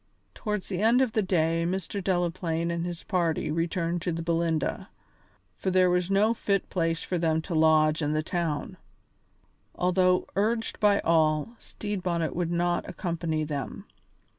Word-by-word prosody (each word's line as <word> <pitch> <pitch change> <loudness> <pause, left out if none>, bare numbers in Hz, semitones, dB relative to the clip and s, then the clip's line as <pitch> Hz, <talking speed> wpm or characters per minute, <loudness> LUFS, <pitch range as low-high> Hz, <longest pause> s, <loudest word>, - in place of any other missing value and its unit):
Towards 210 -3 -3
the 185 -1 -3
end 230 +3 +4
of 250 - -1
the 215 - +1
day 165 -3 +1
Mr. 190 +2 -3
Delaplaine 170 -2 -1
and 170 0 -2
his 175 -1 -6
party 170 -5 0
returned 165 +1 -1
to 175 - -1
the 165 0 -3
Belinda, 165 -2 -1 0.7
for - - -1
there 185 -1 +4
was 180 0 +1
no 205 +3 +3
fit 200 -4 -1
place 165 -2 0
for 180 - -2
them 160 -1 +1
to 175 - -5
lodge 155 0 +4
in 150 0 0
the 155 0 0
town. 165 -3 -2 1.0
Although 180 0 +2
urged 225 +3 0
by 205 -1 +4
all, 155 0 +2
Stede 205 -2 -5
Bonnet 170 -3 -1
would 170 -1 -1
not 175 0 0
accompany 165 -3 -2
them. 140 -7 -5
175 Hz, 160 wpm, -27 LUFS, 165-185 Hz, 1.0 s, end